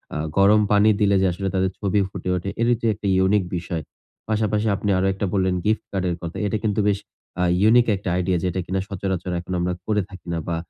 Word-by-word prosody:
আ - - -1 0.2
গরম 105 +2 +6
পানি 105 +1 +5
দিলে 100 -1 +4
যে 95 - +3
আসলে 95 +2 -3
তাদের 95 0 +1
ছবি 100 0 +1
ফুটে 90 - -5
ওঠে, 90 +2 -3
এটির 120 0 +3
যে 115 - +1
একটি 105 0 -5
ইউনিক 95 +2 +3
বিষয়। 85 -1 -4 0.5
পাশাপাশি 110 0 0
আপনি 105 - -3
আরও 95 +1 +1
একটা 100 +1 -2
বললেন 95 -2 +1
গিফট 110 +1 +1
কার্ডের 95 -3 -1
কথা। 85 0 -6
এটা 105 +2 0
কিন্তু 105 -1 0
বেশ 100 -1 0 0.4
আ - - +3 0.2
ইউনিক 120 +3 +5
একটা 95 -1 -4
আইডিয়া। 90 0 +1
যেটা 90 0 -1
কিনা 95 +2 -1
সচরাচর 95 -2 -3
এখন 90 +1 -6
আমরা 90 +1 0
করে 105 -1 +1
থাকি 95 -2 -13
না। 85 - -1
বা, 85 - -1
95 Hz, 220 wpm, -22 LUFS, 90-105 Hz, 0.5 s, গরম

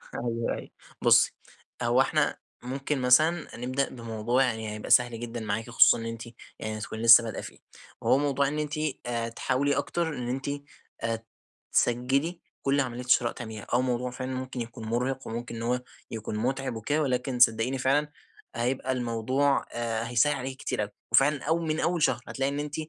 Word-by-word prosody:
أيوه 115 -1 -1
أيوه، - - -9 0.3
بُصي - - +5 0.5
هو - - +4
إحنا - - +1 0.3
ممكن 135 +2 -2
مثلًا 155 +6 +4
نبدأ 130 +3 -1
بموضوع 115 +1 0
يعني 110 -4 -2
هيبقى 105 - -7
سهل 120 -2 +4
جدًا 120 0 -5
معاكِ 110 +1 -3
خصوصًا 120 - +6
إن 115 - -6
أنتِ 115 0 -5 0.4
يعني 110 0 -4
هتكوني 110 +1 -6
لسه 115 0 +9
بدأه 115 - -4
فيه، - - -10 0.4
هو - - +4
موضوع 140 -1 +1
إن 150 +2 -2
أنتِ 150 -1 -3 0.3
آآ، 115 -1 -2
تحاولي 135 +4 0
أكتر 165 +4 -1
إن 125 -1 -4
أنتِ 130 +2 -2 0.5
آآ 115 0 -2 0.5
تسجلي 135 +8 +1 0.2
كل 140 +1 +2
عملية 125 -2 -2
شراء 120 -1 +4
تعمليها، 110 -3 -8
آه، 120 - +4
موضوع 125 0 -1
فعلًا 130 +1 -5
ممكن 130 -1 -4
يكون 115 -1 -7
مرهق 125 +4 -1
وممكن 115 +1 -5
إن 115 - -6
هو 125 +1 0 0.3
يكون 110 -1 -4
متعب 130 +2 -1
وكده، 145 +8 0
ولكن 125 -2 -1
صدقيني 120 +2 +4
فعلًا 145 +3 +1 0.4
هيبقى 125 +3 -1
الموضوع 130 +3 +1
آآ، 115 -1 -2
هيسهل 120 +5 +3
عليكِ 130 0 -5
كتير - - -2
أوي، 105 0 -3 0.2
وفعلًا 135 +4 +4
أو 165 +1 +1
من 160 -1 -1
أول 170 -2 +1
شهر 120 -1 +2
هتلاقي 135 0 -1
إن 140 - -3
أنتِ 150 0 -4
125 Hz, 175 wpm, -28 LUFS, 115-135 Hz, 0.5 s, لسه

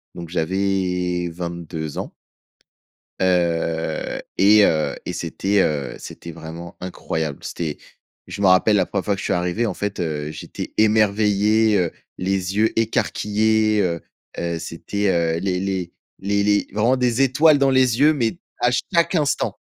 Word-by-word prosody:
Donc 85 -1 -8
j'avais 90 0 -1
22 85 -2 -5
ans - - -5 1.1
heu 85 -3 0 0.2
et 105 +2 +6
heu 80 -1 +1
et - - -4
c'était, 100 0 0
heu, 70 -6 -1
c'était 85 - -9
vraiment 85 +2 -9
incroyable. 80 -5 -4
C'était 80 -4 -4 0.5
je 100 - -6
me 100 - +4
rappelle 95 +3 +5
la 95 - +2
1re 100 0 -3
fois 100 - +1
que - - -9
je - - -5
suis - - +1
arrivé, 90 +6 0
en 110 - -1
fait, 105 -1 -4
heu, 75 -3 -3
j'étais 75 - -7
émerveillé, 105 0 +3
heu, 85 -2 0 0.3
les 95 0 -1
yeux 110 +2 +3
écarquillés, 110 -1 +1
heu 85 -3 -1 0.4
heu, 85 -1 -2
c'était, 100 +5 -3
heu, 85 -2 +1
les 90 0 -1
les 95 -2 -2 0.3
les 100 +1 0
les 105 0 +2
vraiment 115 +5 +2
des 125 0 +1
étoiles 145 +4 +5
dans 135 -1 +3
les 130 -3 +3
yeux, 150 +2 +6
mais, 125 +1 -1 0.2
à 120 - +4 0.2
chaque 170 +2 +3
instant! 150 -4 0
95 Hz, 155 wpm, -21 LUFS, 85-110 Hz, 1.1 s, et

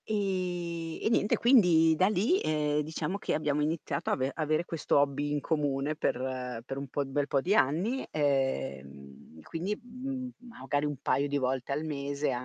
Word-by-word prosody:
Ehm, 175 -5 -2
e - - +1
niente 215 -2 +2
quindi 175 -10 +5
da 185 +4 +4
lì, 215 - +2
ehm, 150 -1 +1
diciamo 160 +4 -3
che - - -1
abbiamo 150 -1 0
iniziato 150 -2 -2
ave 130 +1 0
avere 155 +1 0
questo 160 -5 0
hobby 145 +1 0
in 145 - +1
comune, 145 -1 0
per 125 -3 -2
per 135 - -5
un 140 0 -5
po' 140 +2 -2
bel 140 +1 -1
po' 140 - +2
di 185 +8 +1
anni, 200 - +1
ehm, 70 - -2
quindi, 180 - -3
mhmm, 255 +1 -5 0.3
magari 145 +3 0
un 145 -1 -2
paio 140 +1 +1
di 145 0 0
volte 130 0 -1
al 145 +3 -1
mese 145 -1 -2
150 Hz, 170 wpm, -30 LUFS, 140-175 Hz, 0.3 s, quindi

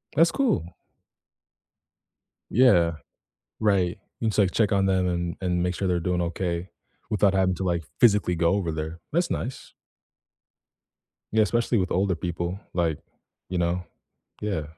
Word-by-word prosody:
That's 165 +1 +5
cool. 90 - 0 1.8
Yeah. 90 -9 +5 0.7
Right. 95 -5 +1 0.2
You 115 - -1
can - - +3
just 105 - -5
like 95 -3 +4
check 110 -3 +2
on 100 -1 +3
them 95 -1 +2
and 85 -1 -2
and 90 -2 0
make 90 0 0
sure 95 0 -1
they're 90 -1 +1
doing 90 +1 0
okay 85 +1 -2 0.4
without 100 -2 +3
having 95 -1 +2
to, 95 - -3
like, 85 -2 0 0.2
physically 105 -6 +4
go 85 0 +3
over 95 -5 -1
there. 80 +1 -5
That's 170 +2 +1
nice. 130 - -5 1.6
Yeah, 110 0 +4
especially 115 +3 +1
with 95 -2 0
older 95 0 +1
people. 85 +2 -3
Like, 85 -4 0 0.5
you 90 - -2
know, 85 +1 0 0.6
yeah. 100 -7 -1
90 Hz, 150 wpm, -25 LUFS, 85-105 Hz, 1.8 s, That's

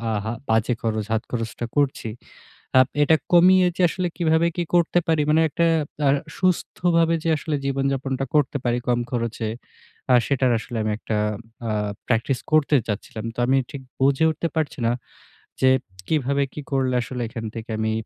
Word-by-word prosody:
আহা 110 +2 -2 0.2
বাজে 110 +2 +2
খরচ 110 -2 -1
হাত 110 - +1
খরচটা 115 0 -3
করছি। 140 -5 +1 0.7
আপ 130 - +5 0.2
এটা 160 +2 +5 0.2
কমিয়ে 180 +1 +6
যে - - 0
আসলে 180 +1 -2
কিভাবে 165 -1 +3
কি 175 - +1
করতে 175 0 +3
পারি? 160 -2 +2
মানে 155 +1 +4
একটা 170 +3 +1 0.4
আ - - +5 0.3
সুস্থভাবে 170 -2 +2
যে 165 - 0
আসলে 150 0 -2
জীবনযাপনটা 135 -1 -1
করতে 145 -1 +2
পারি 120 0 +2
কম 120 -1 +2
খরচে, 115 -2 -2 0.6
আ - - +7
সেটার 130 -3 +2
আসলে 115 +1 -6
আমি 110 - 0
একটা 110 - -2 0.5
আ - - 0 0.4
প্র্যাকটিস 120 +2 +1
করতে 155 -1 +4
চাচ্ছিলাম। 110 +1 -5
তো - - -6
আমি 135 +1 +3
ঠিক 140 -2 -7 0.2
বুঝে 135 +3 +3
উঠতে 160 +2 -2
পারছি 155 -3 -2
না, - - +2 0.7
যে 130 - +6 0.4
কিভাবে, 140 -2 +1
কি - - -6
করলে 130 -2 +1
আসলে 125 +1 -5
এখান 115 0 -6
থেকে 115 0 -7
আমি 110 0 0
135 Hz, 165 wpm, -23 LUFS, 115-160 Hz, 0.7 s, আ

